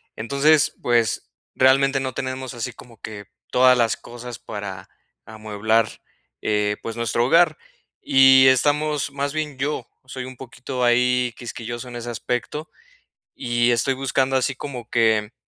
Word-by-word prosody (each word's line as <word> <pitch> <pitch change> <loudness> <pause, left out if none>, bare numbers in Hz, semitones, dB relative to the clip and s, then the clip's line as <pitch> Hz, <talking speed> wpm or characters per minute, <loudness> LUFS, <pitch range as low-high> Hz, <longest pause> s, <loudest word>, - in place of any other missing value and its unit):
entonces, 140 +7 +2
pues, 120 -2 +1 0.3
realmente 135 +1 +4
no 130 -1 -3
tenemos 130 +1 -5
así 120 +1 -5
como 115 -3 -16
que 105 -2 -8 0.3
todas 125 0 +5
las 115 -2 +2
cosas 120 -1 -9
para 95 -2 -7 0.4
amueblar, 110 +1 0 0.5
eh, 105 -1 0
pues, 115 0 -5
nuestro 115 0 0
hogar, 165 +2 +4 0.4
y 130 0 +6
estamos 145 +3 +2
más 140 0 -2
bien 150 -2 -4
yo, 145 +3 -3 0.2
soy 130 -1 -7
un 130 0 -9
poquito 125 0 -6
ahí 125 0 +2
quisquilloso 120 +1 -7
en 120 - -9
ese 120 0 -6
aspecto 125 +6 -4 0.7
y 120 0 +1
estoy 120 +3 +1
buscando 135 0 0
así 130 0 0
como 125 -4 -7
que 110 -2 +2
125 Hz, 140 wpm, -22 LUFS, 115-135 Hz, 0.7 s, y